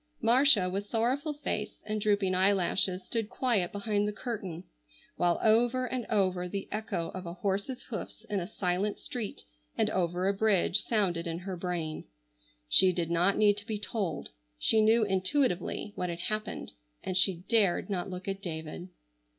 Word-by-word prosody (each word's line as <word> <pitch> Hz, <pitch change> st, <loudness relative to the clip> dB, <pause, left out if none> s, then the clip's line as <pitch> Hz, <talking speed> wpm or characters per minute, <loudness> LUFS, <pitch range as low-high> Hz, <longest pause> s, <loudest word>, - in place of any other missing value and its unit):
Marcia 235 Hz, -4 st, +5 dB
with 195 Hz, +3 st, -3 dB
sorrowful 255 Hz, +7 st, 0 dB
face 215 Hz, -7 st, -3 dB
and 215 Hz, 0 st, -2 dB
drooping 200 Hz, -3 st, +2 dB
eyelashes 185 Hz, 0 st, +2 dB
stood 225 Hz, +2 st, -2 dB
quiet 230 Hz, -11 st, +1 dB
behind 205 Hz, 0 st, 0 dB
the -, -, -1 dB
curtain, 200 Hz, -7 st, -5 dB, 0.5 s
while 175 Hz, -1 st, +1 dB
over 240 Hz, +3 st, +3 dB
and 250 Hz, -2 st, -4 dB
over 185 Hz, -4 st, +1 dB
the 195 Hz, +1 st, -4 dB
echo 200 Hz, -6 st, -3 dB
of 185 Hz, -1 st, -7 dB
a 170 Hz, -, -6 dB
horse's 200 Hz, +7 st, -2 dB
hoofs 220 Hz, -2 st, -7 dB
in 205 Hz, -2 st, -1 dB
a 175 Hz, -, -4 dB
silent 195 Hz, 0 st, -1 dB
street 230 Hz, -5 st, -6 dB, 0.3 s
and -, -, +1 dB
over 180 Hz, 0 st, 0 dB
a 200 Hz, -, +3 dB
bridge 200 Hz, -2 st, +3 dB
sounded 185 Hz, -6 st, 0 dB
in 165 Hz, 0 st, -3 dB
her 185 Hz, +1 st, -5 dB
brain. 170 Hz, -3 st, -3 dB, 0.6 s
She 185 Hz, -, +6 dB
did 170 Hz, -2 st, -2 dB
not 175 Hz, +4 st, +3 dB
need 205 Hz, -1 st, +4 dB
to 205 Hz, +1 st, -6 dB
be 220 Hz, -3 st, -2 dB
told, 200 Hz, -7 st, -3 dB, 0.3 s
she 220 Hz, -, +3 dB
knew 220 Hz, +1 st, +4 dB
intuitively 190 Hz, +1 st, +1 dB
what 180 Hz, -, -2 dB
had 170 Hz, 0 st, -5 dB
happened, 215 Hz, +3 st, -3 dB, 0.3 s
and 185 Hz, -, -3 dB
she 185 Hz, -2 st, +3 dB
dared 210 Hz, -6 st, +3 dB
not 195 Hz, -2 st, -3 dB
look 185 Hz, +1 st, -7 dB
at 195 Hz, 0 st, -3 dB
David. 160 Hz, 0 st, -5 dB
195 Hz, 165 wpm, -30 LUFS, 180-215 Hz, 0.6 s, She